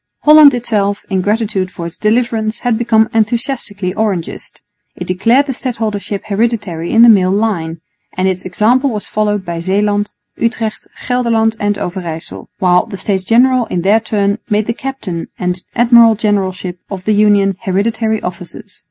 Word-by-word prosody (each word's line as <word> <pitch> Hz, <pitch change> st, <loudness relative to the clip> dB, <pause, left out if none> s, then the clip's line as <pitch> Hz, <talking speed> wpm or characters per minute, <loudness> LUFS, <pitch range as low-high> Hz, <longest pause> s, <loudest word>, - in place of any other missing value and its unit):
Holland 300 Hz, -3 st, +7 dB
itself, 205 Hz, -4 st, -1 dB
in 190 Hz, -1 st, +1 dB
gratitude 205 Hz, -2 st, -1 dB
for 170 Hz, -2 st, -8 dB
its 170 Hz, -, -8 dB
deliverance, 220 Hz, 0 st, 0 dB
had 245 Hz, -2 st, +1 dB
become 220 Hz, -1 st, +2 dB
enthusiastically 225 Hz, -4 st, -1 dB
Orangist. 200 Hz, -6 st, -4 dB, 0.3 s
It -, -, -6 dB
declared 230 Hz, +10 st, +2 dB
the 270 Hz, -, -3 dB
stadholdership 220 Hz, -5 st, -4 dB
hereditary 205 Hz, -6 st, -2 dB
in 230 Hz, 0 st, +6 dB
the -, -, +8 dB
male 195 Hz, -5 st, +5 dB
line, 185 Hz, -6 st, -1 dB, 0.4 s
and 185 Hz, +1 st, +1 dB
its 185 Hz, -1 st, -1 dB
example 230 Hz, +9 st, +1 dB
was 210 Hz, -4 st, -4 dB
followed 210 Hz, -2 st, -1 dB
by 170 Hz, -1 st, -4 dB
Zeeland, 205 Hz, +3 st, 0 dB, 0.3 s
Utrecht, 230 Hz, -2 st, -2 dB, 0.2 s
Gelderland 230 Hz, -3 st, +1 dB
and 205 Hz, 0 st, 0 dB
Overyssel, 175 Hz, -4 st, -6 dB
while 180 Hz, -2 st, +2 dB
the 195 Hz, -, -7 dB
States 190 Hz, -1 st, -2 dB
General 245 Hz, +4 st, +3 dB
in 175 Hz, -, -3 dB
their 205 Hz, +4 st, +4 dB
turn 205 Hz, -1 st, -1 dB
made 210 Hz, -1 st, +1 dB
the 230 Hz, -, -2 dB
captain 235 Hz, -10 st, -5 dB
and 180 Hz, 0 st, -3 dB
admiral 235 Hz, -1 st, +5 dB
generalship 190 Hz, -4 st, -2 dB
of 190 Hz, -2 st, -6 dB
the 215 Hz, -, +2 dB
Union 205 Hz, -2 st, +3 dB
hereditary 220 Hz, +2 st, -1 dB
offices. 180 Hz, -1 st, -8 dB
210 Hz, 155 wpm, -14 LUFS, 185-230 Hz, 0.4 s, the